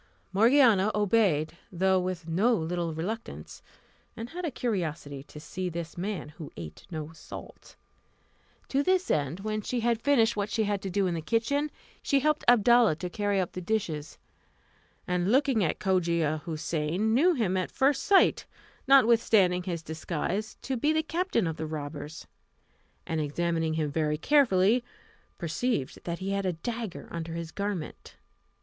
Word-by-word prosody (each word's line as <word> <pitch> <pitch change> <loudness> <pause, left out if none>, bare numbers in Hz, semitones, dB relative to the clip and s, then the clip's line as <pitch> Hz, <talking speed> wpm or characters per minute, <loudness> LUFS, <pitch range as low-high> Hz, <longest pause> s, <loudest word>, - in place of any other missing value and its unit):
Morgiana 225 -2 +5
obeyed, 195 -7 +2
though 190 +1 +2
with 180 -2 -4
no 205 +9 +3
little 170 -1 -2
reluctance, 195 +9 -6 0.6
and 230 +2 -6
had 360 +2 -6
a 330 - 0
curiosity 165 - -3
to 150 - -11
see 180 +4 -4
this 170 -1 -6
man 185 -2 -4
who 150 -1 -10
ate 80 -2 -9
no 155 -3 -5
salt. 160 - -11 0.9
To 275 - +2
this 370 +4 +1
end, 150 +4 -1
when 215 +1 -2
she 240 +3 -2
had 230 -1 +1
finished 235 -5 +3
what 205 0 -2
she 220 +1 0
had 205 -1 -1
to 195 - -4
do 195 +2 +1
in 180 - 0
the 165 - -3
kitchen, 235 - 0 0.3
she 280 - +2
helped 300 +2 +1
Abdalla 240 -4 +6
to 180 +2 -6
carry 205 +1 0
up 185 - -1
the 180 - -6
dishes; 170 -7 -2 0.9
and 180 +2 +1
looking 265 -4 +3
at 160 - 0
Cogia 170 -5 +1
Houssain, 165 +6 -1
knew 335 +8 +4
him 210 -8 0
at 185 -1 -1
first 275 0 +2
sight, 395 -2 +4 0.4
notwithstanding 225 -8 +5
his 175 -3 -4
disguise, 170 +7 -3
to 265 - -2
be 295 +6 +2
the 315 0 +1
captain 335 - 0
of 160 -1 -3
the 160 - -4
robbers, 150 0 -6 0.8
and 160 -1 -1
examining 160 +1 -1
him 155 -2 -1
very 150 0 0
carefully, 230 - +3 0.5
perceived 170 - -2
that 170 -1 -3
he 190 +2 -4
had 200 -1 -1
a 180 - 0
dagger 225 +3 -5
under 165 -1 -5
his 165 -1 -5
garment. 200 -5 -5
190 Hz, 160 wpm, -28 LUFS, 165-230 Hz, 0.9 s, Abdalla